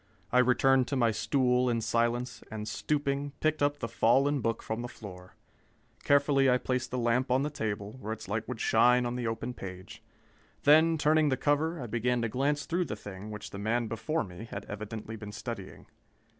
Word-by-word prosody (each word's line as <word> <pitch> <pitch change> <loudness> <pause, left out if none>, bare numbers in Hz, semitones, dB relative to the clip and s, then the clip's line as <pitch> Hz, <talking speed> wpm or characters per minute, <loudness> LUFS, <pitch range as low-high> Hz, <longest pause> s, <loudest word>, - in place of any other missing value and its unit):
I 125 - +4
returned 130 +1 +4
to 140 - -2
my 120 -3 +3
stool 125 +2 +2
in 115 -1 +1
silence, 115 +2 0
and 110 -1 -5
stooping, 140 +4 -1
picked 155 -1 0
up 145 0 +2
the 115 - -4
fallen 135 +5 +3
book 115 0 -1
from 110 +1 -3
the 120 - -4
floor. 90 -6 -11 0.7
Carefully 140 -1 +4
I 125 - +4
placed 125 0 -2
the 125 - -3
lamp 125 +2 +1
on 130 +2 +2
the 150 - -2
table, 110 -4 -4
where 110 - -4
its 110 - -6
light 110 +3 -2
would 125 -3 -5
shine 125 +2 +4
on 120 0 -2
the 125 -2 -2
open 115 +2 -3
page. 95 -4 -9 0.6
Then, 160 +3 +6
turning 155 0 +3
the 130 - +1
cover, 155 +3 +1
I 125 - -4
began 120 +1 0
to 115 - 0
glance 140 +5 0
through 175 +1 0
the 105 - -4
thing 100 0 -9
which 105 0 -7
the 100 - -7
man 115 +3 0
before 115 +9 -2
me 90 +4 -9
had 100 -2 -7
evidently 110 +2 -6
been 105 -1 -8
studying. 105 -2 -7
120 Hz, 200 wpm, -30 LUFS, 110-140 Hz, 0.7 s, Then